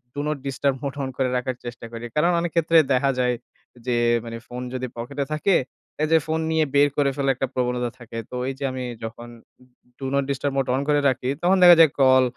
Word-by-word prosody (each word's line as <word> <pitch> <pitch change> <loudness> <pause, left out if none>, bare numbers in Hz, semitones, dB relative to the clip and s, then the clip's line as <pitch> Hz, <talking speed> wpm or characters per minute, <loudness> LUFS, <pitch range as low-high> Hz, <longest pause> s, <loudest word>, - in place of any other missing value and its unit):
do - - -4
not 150 - -1
disturb 135 +1 0
mode 140 -1 -4
on 130 - -3
করে 130 -1 +1
রাখার 125 0 -2
চেষ্টা 120 -1 -7
করি। 115 +1 -6
কারণ 170 +4 +3
অনেক 170 -1 -2
ক্ষেত্রে 165 0 +3
দেখা 135 +2 +3
যায় 125 -1 +2 0.5
যে 125 - +1 0.3
মানে 115 0 -6
ফোন 125 +1 -6
যদি 130 0 -3
পকেটে 140 +4 -4
থাকে, 170 +5 +2 0.5
এই - - +2
যে 165 - +7
ফোন 160 0 0
নিয়ে 160 -1 +2
বের 145 +1 +5
করে 140 -2 +3
ফেলার 135 -1 +1
একটা 135 - -2
প্রবণতা 125 -1 -1
থাকে। 115 -1 -9
তো - - -6
এই - - -3
যে - - -5
আমি 130 0 -5 0.2
যখন 120 +1 -7 0.7
do 135 - -5
not 140 0 +2
disturb 140 0 -1
mode 135 -2 0
on 135 - 0
করে 145 0 +4
রাখি, 130 0 -2
তখন 185 +2 +3
দেখা 175 -1 +10
যায় 155 -4 +6
কল 130 -1 +6
135 Hz, 225 wpm, -23 LUFS, 125-145 Hz, 0.7 s, দেখা